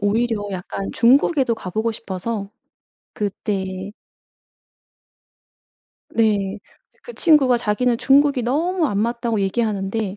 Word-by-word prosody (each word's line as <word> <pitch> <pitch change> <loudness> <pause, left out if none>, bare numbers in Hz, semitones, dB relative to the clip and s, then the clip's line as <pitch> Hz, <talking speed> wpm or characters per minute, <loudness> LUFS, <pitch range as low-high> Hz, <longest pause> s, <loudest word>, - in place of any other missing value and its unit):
오히려 205 0 0
약간 190 +1 -5
중국에도 260 +1 +3
가 185 -4 -8
보고 220 +4 -1
싶어서 200 0 -5 0.6
그때 195 -1 -4 2.2
네. 210 -3 +1 0.4
그 485 - -9
친구가 290 - +4
자기는 235 +1 0
"중국이 280 -1 +3
너무 320 +7 0
안 200 -5 -2
맞다."고 235 -1 -1
얘기하는데 200 0 -1
225 Hz, 230 characters per minute, -21 LUFS, 200-245 Hz, 2.2 s, 친구가